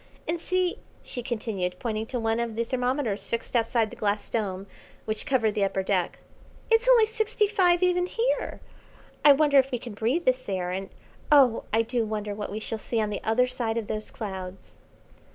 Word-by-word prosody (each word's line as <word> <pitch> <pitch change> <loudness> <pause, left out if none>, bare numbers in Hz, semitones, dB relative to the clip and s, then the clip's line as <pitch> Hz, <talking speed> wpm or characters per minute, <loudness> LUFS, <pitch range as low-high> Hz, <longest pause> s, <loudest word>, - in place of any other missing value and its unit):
And 330 0 -2
see," 365 0 0 0.2
she 245 - -5
continued, 215 -6 -3
pointing 220 0 -3
to 250 - -3
one 225 0 0
of 235 -2 -2
the 230 - 0
thermometers 250 -3 -1
fixed 230 +2 -4
outside 230 -1 +2
the - - -9
glass 205 0 -2
dome 195 -4 -2 0.4
which 215 +5 -3
covered 235 -6 +2
the 205 - +1
upper 195 -1 0
deck, 190 -2 0 0.5
"it's 455 +2 +4
only 475 -3 +7
sixty 440 -1 0
five 365 -4 +3
even 360 0 +2
here. 475 +6 -1 0.6
I 290 - +9
wonder 285 -1 +5
if 265 0 +2
we 250 - -1
can 235 -1 -8
breathe 240 +12 0
this 255 -3 +1
air, 180 -2 -2
and 190 +1 -4 0.4
oh 265 -6 +5
I 225 +1 +3
do 235 +1 -1
wonder 210 -1 -3
what 205 -1 -5
we 210 - -3
shall 220 0 -4
see 230 +1 -2
on 210 -1 0
the 205 - -3
other 225 +3 +3
side 240 -3 -2
of 225 - -2
those 215 +1 -4
clouds." 190 -3 -7
230 Hz, 195 wpm, -26 LUFS, 210-280 Hz, 0.6 s, I